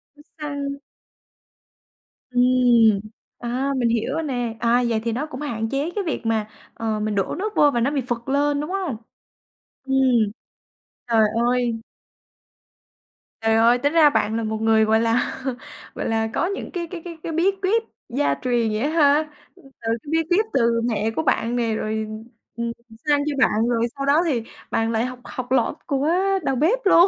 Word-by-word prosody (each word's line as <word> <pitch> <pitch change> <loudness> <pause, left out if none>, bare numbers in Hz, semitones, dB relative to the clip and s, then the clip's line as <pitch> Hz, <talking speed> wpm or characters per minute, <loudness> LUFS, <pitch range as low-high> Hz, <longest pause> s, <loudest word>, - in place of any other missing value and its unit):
Nó 295 - -17 0.2
săn. 285 -2 -4 1.5
Ừm, 245 -4 +4 0.4
à, 255 +3 -1
mình 240 -2 +2
hiểu 230 +4 0
rồi 325 +1 -1
nè. 245 -5 -2
À, 240 +1 +3
vậy 220 -1 +1
thì 230 - -1
nó 260 +7 -2
cũng 295 -2 -8
hạn 225 -6 -3
chế 285 +5 -1
cái 405 - -1
việc 310 -7 -3
mà, 220 -2 0 0.3
ờ, 220 -1 -2
mình 210 -1 -1
đổ 195 - -1
nước 425 +3 -3
vô 290 -1 +5
và 240 - 0
nó 265 +5 +1
bị 280 -3 0
phựt 240 -1 -2
lên, 285 +1 +2
đúng 300 - -5
hông? 365 - -2 0.9
Ừm, 270 0 -1 1.1
trời 230 -2 +3 0.3
ơi. 245 -2 +1 1.6
Trời 225 0 +2
ơi! 235 +2 +5
Tính 285 +5 0
ra 310 -3 +7
bạn 220 -5 0
là 230 - -2
một 220 0 -2
người, 220 -1 +4
gọi 220 +1 +3
là, 230 +3 0 0.5
gọi - - -4
là, 225 0 +1
có - - +1
những 400 - -5
cái 345 -3 -4
cái 345 -3 -6
cái 335 -2 -7
cái 330 - -4
bí 340 +5 +2
quyết 440 +4 +2 0.3
gia 275 +4 +1
truyền 240 -3 +1
vậy 215 - -1
á 285 - 0
ha, 305 -1 +3 0.3
từ - - -20 0.2
cái 230 +5 -3
bí 325 0 +2
quyết 410 +5 +3
từ 230 -2 +2
mẹ 225 -2 0
của 320 - 0
bạn 235 -3 +1
nè 230 -2 0
rồi, 220 0 -2 0.5
ừm, 235 0 -2 0.2
ừm, 225 -1 -16
sang 290 -1 +4
cho 285 - -2
bạn, 220 +2 0
rồi 230 -1 +1
sau 275 - -2
đó 300 +5 +4
thì 250 -9 0 0.3
bạn 225 0 +1
lại 225 +2 +1
học 255 -1 -6
học 255 0 -7
lỏm 245 -4 +2
của 280 +1 0 0.4
đầu 270 - 0
bếp 345 - +2
luôn. 360 -1 +7
250 Hz, 190 wpm, -22 LUFS, 225-295 Hz, 1.6 s, ra